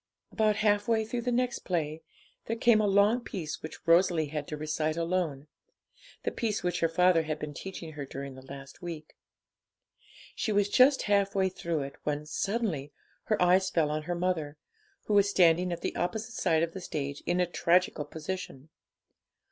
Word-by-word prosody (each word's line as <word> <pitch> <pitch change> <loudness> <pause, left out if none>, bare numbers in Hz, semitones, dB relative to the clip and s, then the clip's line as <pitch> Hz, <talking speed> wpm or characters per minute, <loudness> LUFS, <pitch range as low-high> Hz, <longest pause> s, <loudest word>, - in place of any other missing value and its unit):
About 215 -1 +2
half 205 -1 +2
way 225 -1 +2
through 240 +2 -3
the 245 - -1
next 245 0 0
play 160 -3 -2 0.5
there 230 - -1
came 230 -1 +4
a 210 - +2
long 200 +4 +4
piece 165 -10 -5
which 155 - -9
Rosalie 165 -2 +4
had 150 -1 -4
to 150 - -5
recite 155 +1 -1
alone, 165 -5 -1 0.8
the - - -1
piece 220 -3 -2
which 175 -1 0
her 165 - +2
father 180 0 +4
had 155 -1 -3
been 150 -1 -6
teaching 170 0 -7
her 150 -2 -6
during 135 0 -7
the 130 - -11
last 135 +1 -11
week. 165 -3 -7 1.2
She 220 - -1
was 205 -1 +2
just 265 +4 +5
half 200 -1 +2
way 190 -1 +2
through 170 -4 -3
it, 135 0 -8
when, 150 0 -2
suddenly, 170 - -2 0.3
her 215 - +1
eyes 185 +1 +4
fell 155 -3 +1
on 155 0 -1
her 175 +3 -3
mother, 170 -4 -1 0.5
who 210 - -1
was 200 -1 +5
standing 180 -1 +4
at 170 - -4
the - - -3
opposite 220 +6 -2
side 160 -6 +2
of 165 0 -2
the 190 - -6
stage 140 -4 -4
in 175 +1 +1
a 180 - +4
tragical 175 -2 +2
position. 155 -2 -6
175 Hz, 185 wpm, -29 LUFS, 155-200 Hz, 1.2 s, just